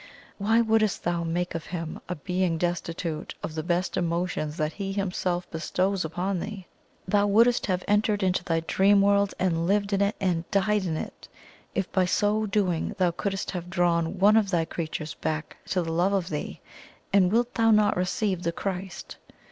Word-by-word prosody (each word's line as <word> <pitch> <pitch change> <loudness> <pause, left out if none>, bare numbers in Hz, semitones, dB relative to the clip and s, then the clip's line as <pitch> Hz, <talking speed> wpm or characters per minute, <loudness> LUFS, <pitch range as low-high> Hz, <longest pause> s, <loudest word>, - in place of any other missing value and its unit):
Why 220 +3 +3
wouldst 220 -3 +2
thou 170 0 0
make 175 +2 -2
of 165 -1 -5
Him 165 -2 -5
a 180 - -2
being 180 +1 -1
destitute 170 -2 -3
of 155 - -4
the 160 - -2
best 175 +3 -1
emotions 170 -3 -1
that 155 -1 -1
He 195 -1 -4
Himself 180 -2 -1
bestows 185 +4 0
upon 180 +4 -2
thee? 200 -1 -6 0.4
THOU 205 +2 +3
wouldst 230 +4 +4
have 185 -2 0
entered 210 0 +2
into 185 -1 +1
thy 165 -2 0
dream 195 +4 +4
world 200 0 +3
and 170 -2 0
lived 200 +1 +1
in 200 - +2
it 200 +1 +2
and 175 -3 -1
died 200 0 +1
in 160 -3 -1
it, - - -7 0.5
if 190 -1 -1
by 185 -1 +2
so 210 +3 +1
doing 195 -5 0
thou 180 -2 +3
couldst 195 +2 -3
have 180 -2 -5
drawn 170 -1 +1
one 205 +4 +5
of 210 -3 +2
thy 170 -3 +1
creatures 160 -2 -4
back 155 -1 -4
to 180 -2 0
the 165 - -3
love 175 +4 +2
of 190 -4 0
thee; 150 - -4 0.5
and 190 -2 +5
wilt 240 +2 +1
thou 225 -1 +3
not 210 -1 +4
receive 185 +1 -1
the 170 - 0
Christ?" 185 0 -5
185 Hz, 185 wpm, -26 LUFS, 170-200 Hz, 0.5 s, one